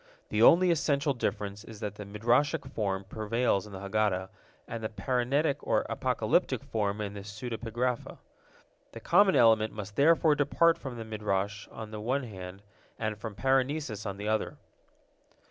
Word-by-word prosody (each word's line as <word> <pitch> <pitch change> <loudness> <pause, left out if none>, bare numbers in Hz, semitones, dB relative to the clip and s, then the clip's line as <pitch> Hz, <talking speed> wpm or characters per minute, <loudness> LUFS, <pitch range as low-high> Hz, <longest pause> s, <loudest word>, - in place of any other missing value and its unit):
The - - 0
only 180 +1 +7
essential 145 -3 +1
difference 100 -3 -3
is 110 -2 -11
that 105 -2 -4
the 105 0 -8
Midrashic 115 +8 +1
form 100 -3 -1
prevails 110 0 -1
in - - -12
the 95 - -7
Haggadah, 100 -2 0 0.4
and 115 -1 -6
the 110 - -2
parenetic 130 +7 0
or - - +1
apocalyptic - - +1
form 105 -2 -1
in 100 -1 -4
the 100 - -7
pseudepigrapha. 115 +3 -3 0.8
The - - -7
common 200 -2 +4
element 110 -2 +4
must 105 -1 -7
therefore 160 +1 +5
depart 150 +3 +3
from 130 -3 -7
the 115 - -6
Midrash 105 -2 -2
on 110 -1 -9
the 105 -1 -6
one 130 +5 0
hand 95 -3 -9 0.3
and 110 -1 -2
from 105 0 -7
parenesis 130 -1 0
on 100 -1 -4
the 105 +1 -5
other. 110 0 -1
110 Hz, 160 wpm, -29 LUFS, 105-130 Hz, 0.8 s, only